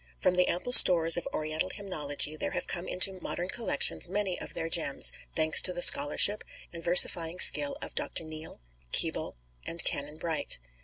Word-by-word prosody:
From 120 - -1
the 180 0 0
ample 215 +8 -4
stores 165 -7 +8
of 175 - -3
Oriental 155 +3 -5
hymnology 155 -7 -5
there - - -7
have - - -5
come 175 +1 -5
into 185 +1 0
modern 175 +2 -7
collections 230 -6 -3
many 195 -2 -4
of - - -8
their 165 -1 -5
gems, 160 -4 -2 0.2
thanks 155 -1 +1
to 180 - +3
the 175 0 0
scholarship 150 +9 +3 0.3
and 165 -1 -10
versifying 170 -1 +3
skill 145 -1 +4
of - - -9
Dr. - - -5
Neale, 155 0 -11 0.3
Keble, - - -2 0.3
and 170 - -2
Canon 145 +2 -4
Bright. 160 - -3
170 Hz, 170 wpm, -26 LUFS, 155-180 Hz, 0.3 s, stores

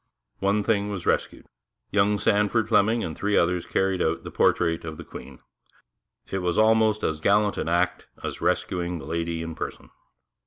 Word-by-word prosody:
One 100 +2 +1
thing 105 -2 +1
was 95 -4 -5
rescued. - - -1 0.5
Young 105 +1 +3
Sandford 105 +3 +1
Fleming 110 +1 +3
and 80 - -4
three 105 0 0
others 85 0 +1
carried 95 -1 0
out - - 0
the - - -7
portrait 85 0 +2
of 80 -1 -6
the - - -8
Queen. 65 -1 -11 0.9
It 95 - -1
was 90 -2 -1
almost 110 -1 +3
as 80 -1 -1
gallant 105 +4 +2
an 80 - -2
act 85 +1 0 0.2
as - - -5
rescuing 90 0 -1
the 70 - -9
Lady 85 +1 -2
in 80 0 -5
person. - - -7
95 Hz, 170 wpm, -25 LUFS, 85-105 Hz, 0.9 s, Young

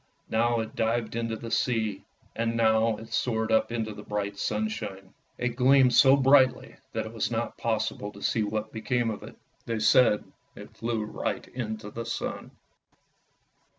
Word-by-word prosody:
Now 115 +1 +2
it 110 - -7
dived 115 0 0
into 115 -1 -2
the 115 0 -7
sea, 110 -5 0 0.3
and 115 0 -1
now 110 -1 +3
it 115 - -10
soared 110 -2 0
up 110 - +3
into 110 -2 -2
the 105 - -9
bright 105 -1 -3
sunshine. 100 -2 -3 0.2
It 125 - 0
gleamed 130 0 +5
so 135 0 +7
brightly 135 -1 +4 0.2
that - - -2
it 110 - -8
was 115 - -1
not 115 0 -2
possible 110 -2 -2
to 100 - -11
see 115 - +1
what 110 +1 -3
became 115 +1 0
of 105 - -6
it; - - -11 0.3
they 115 -1 -1
said 110 0 +4 0.3
it - - -12
flew 115 -2 -2
right 105 - -4
into 110 -4 -5
the 115 +1 -6
sun. 115 - -4
110 Hz, 165 wpm, -27 LUFS, 110-120 Hz, 0.3 s, so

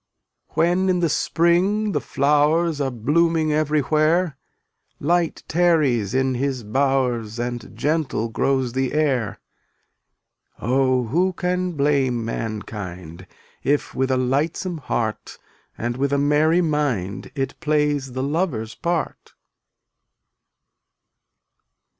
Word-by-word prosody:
291 175 +4 +2
When - - +2
in 180 -1 +2
the 170 -2 +1
spring 185 +8 +2
the - - -1
flowers 150 +3 +2
Are 135 - +1
blooming 155 +6 +1
everywhere, 155 +2 +2 0.6
Light 170 +2 0
tarries 150 - +2
in 130 0 +2
his 130 -1 -2
bowers 125 -2 0
And 120 -1 -5
gentle 150 -6 0
grows 130 +1 0
the 130 0 -1
air. 135 -8 0 1.2
Oh, 130 +2 +2
who 175 +10 +1
can 180 0 -1
blame 140 -5 +1
mankind 95 -6 -6 0.4
If 145 +1 0
with 130 0 0
a 130 - +2
lightsome 155 +7 -1
heart 115 -5 -3 0.4
And 120 +1 -3
with 140 +1 0
a 140 - +2
merry 150 +4 +3
mind 145 - -1
It 135 -2 -3
plays 150 -4 0
the 130 +1 -2
lover's 140 -7 -1
part? 170 -2 -3
140 Hz, 110 wpm, -22 LUFS, 125-165 Hz, 1.2 s, merry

